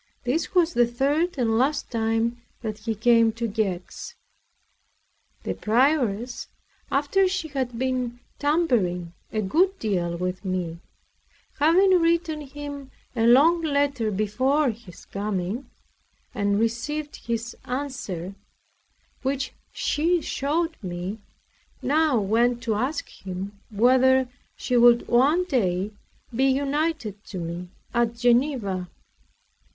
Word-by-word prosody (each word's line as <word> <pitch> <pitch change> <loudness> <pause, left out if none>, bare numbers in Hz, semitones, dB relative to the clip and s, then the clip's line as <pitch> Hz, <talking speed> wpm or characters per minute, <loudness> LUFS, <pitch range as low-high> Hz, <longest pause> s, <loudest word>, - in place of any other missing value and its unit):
This 310 +9 -1
was 345 -1 +4
the 240 0 +4
third 285 +8 0
and 225 -3 +2
last 280 +4 0
time 225 +1 0 0.2
that 215 -1 -4
he 220 +1 -3
came 230 +1 +4
to 230 +1 -2
Gex. 200 -5 -3 1.3
This - - -4
prioress, 245 -1 +1 0.4
after 295 +8 +3
she 365 -3 -2
had 260 -4 -3
been 250 -1 -1 0.2
tampering 230 - +1 0.2
a 215 -1 -1
good 365 - +2
deal 175 -5 -1
with 180 +2 -3
me, 180 -3 -3 0.8
having 360 +4 +5
written 330 -2 +1
him 285 -1 -8 0.3
a 230 -1 +2
long 310 +8 +6
letter 280 -7 +1
before 255 +8 +1
his 215 -5 -13
coming, 205 +4 -3 0.6
and 200 -3 +1
received 265 +7 -2
his 235 0 -2
answer, 250 -9 -4 0.9
which 270 +1 -2 0.2
she 340 +4 +1
showed 325 +3 -1
me, 185 +2 -5 0.6
now 295 -2 +3
went 235 +4 +1
to 230 -1 0
ask 255 +8 -1
him 195 +2 -7
whether 255 +4 +4 0.3
she 250 - -2
would 240 0 +6
one 285 +9 +4
day 200 - 0 0.4
be 265 +3 +3
united 275 - 0
to 190 - -7
me 170 +1 -5 0.2
at 235 -1 +1
Geneva. 235 -7 +1
240 Hz, 115 wpm, -25 LUFS, 210-285 Hz, 1.3 s, long